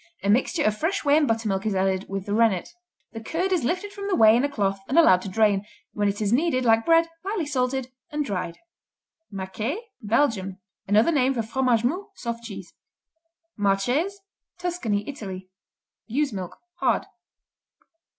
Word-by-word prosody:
A 200 - +3
mixture 270 - +2
of 215 - +2
fresh 325 - -1
whey 285 0 +5
and 305 -2 +3
buttermilk 220 -4 0
is 215 -3 -1
added 190 0 0
with 195 -1 -4
the 205 - -3
rennet. 220 - +2 0.4
"The 225 - -6
curd 350 +11 -2
is 355 -7 +1
lifted 370 +10 -1
from 400 0 -6
the 390 - +1
whey 220 0 +7
in 245 - +2
a 285 - +1
cloth 195 -7 -1
and 275 - +1
allowed 185 - +6
to 195 - -6
drain, 205 0 +2 0.3
when 205 -1 0
it 200 - -3
is 210 +1 +1
kneaded 255 -2 +2
like 225 -1 +3
bread, 330 0 +5 0.2
lightly 390 -3 -2
salted, 260 -2 -1 0.2
and 300 -2 -2
dried." 180 -6 -3 0.7
Maqueé 200 - -3 0.3
Belgium 210 -4 +1 0.3
Another 215 +10 +4
name 270 -3 +2
for 230 - 0
Fromage 240 0 +1
Mou, 355 - -1
Soft 235 -1 -5
Cheese. 195 -5 -9 0.8
Marches 245 - 0 0.4
Tuscany, 335 - -2
Italy 190 -9 -7 0.6
Ewe's 270 +2 0
milk; 185 -2 -6 0.2
hard. - - +1
230 Hz, 170 wpm, -25 LUFS, 200-295 Hz, 0.8 s, whey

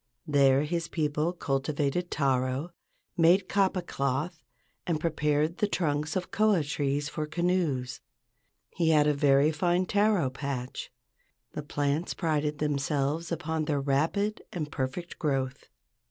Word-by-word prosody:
There 140 -2 +4
his 165 +2 -2
people 155 0 0
cultivated 145 +2 -1
taro, 135 +2 0 0.4
made 180 +2 +4
kapa 190 -2 +1
cloth, 150 +3 -2 0.5
and 165 -3 0
prepared 155 0 0
the 210 - +2
trunks 155 -5 -1
of 185 -1 -3
koa 210 -6 +3
trees 145 0 -1
for 150 0 -4
canoes. 160 -7 -1 0.7
He 165 -2 +2
had 150 -2 +5
a 150 - +3
very 140 +1 +4
fine 175 +4 +1
taro 200 -9 +2
patch. 130 -2 -5 0.6
The - - -5
plants 145 +3 -1
prided 150 -3 0
themselves 150 +2 -1
upon 160 -1 -2
their 150 -2 0
rapid 160 +10 0
and 155 -4 -4
perfect 140 +7 -4
growth. 135 -3 -2
150 Hz, 125 wpm, -28 LUFS, 140-175 Hz, 0.7 s, had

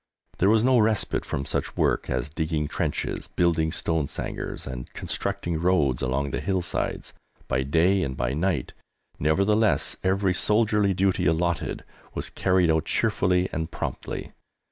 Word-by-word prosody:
There 95 - +4
was 110 0 +4
no 130 -1 +5
respite 110 -1 +2
from 70 - -3
such - - -3
work - - +1
as 65 - -1
digging 80 0 -2
trenches, - - -2
building 80 -2 +1
stone 80 -3 -1
sangars, - - -5
and 65 -1 -7
constructing 85 -2 -3
roads 80 -8 +2
along 70 +2 -1
the - - -2
hill 95 -2 0
sides, - - -3 0.3
by 65 - +1
day 85 +8 +3
and 65 0 -3
by - - -1
night; 80 -3 -1 0.5
nevertheless, 100 +8 +2
every 95 0 +2
soldierly 105 -1 +2
duty 95 -4 +2
allotted 85 +1 0 0.3
was - - -4
carried 90 -3 +2
out 80 -1 +1
cheerfully 90 0 +1
and 80 0 -2
promptly. - - -5
85 Hz, 145 wpm, -25 LUFS, 75-95 Hz, 0.5 s, no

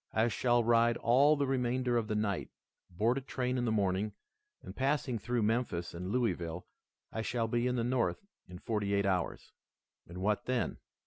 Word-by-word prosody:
I 110 +2 +3
shall 120 +2 +2
ride 115 0 +4
all 135 +6 +4
the 140 -1 0
remainder 125 -1 0
of 115 -2 +1
the 110 - -1
night, 105 -3 -1 0.4
board 115 +9 +1
a - - -11
train 125 -1 -2
in 120 - 0
the 115 - +1
morning, 100 0 0 0.5
and, - - -9
passing 135 -3 0
through 120 +1 -1
Memphis 105 -6 -1
and 90 +2 -5
Louisville, 90 -8 -1 0.5
I 110 - -2
shall 115 0 -1
be 120 +2 0
in 125 - 0
the 120 - 0
North 125 - 0 0.2
in 90 - -9
forty 100 0 -1
eight 100 0 +1
hours." 95 -2 -1 0.6
"And 85 - -9
what 105 +3 0
then?" 125 -1 -1
115 Hz, 185 wpm, -32 LUFS, 100-125 Hz, 0.6 s, ride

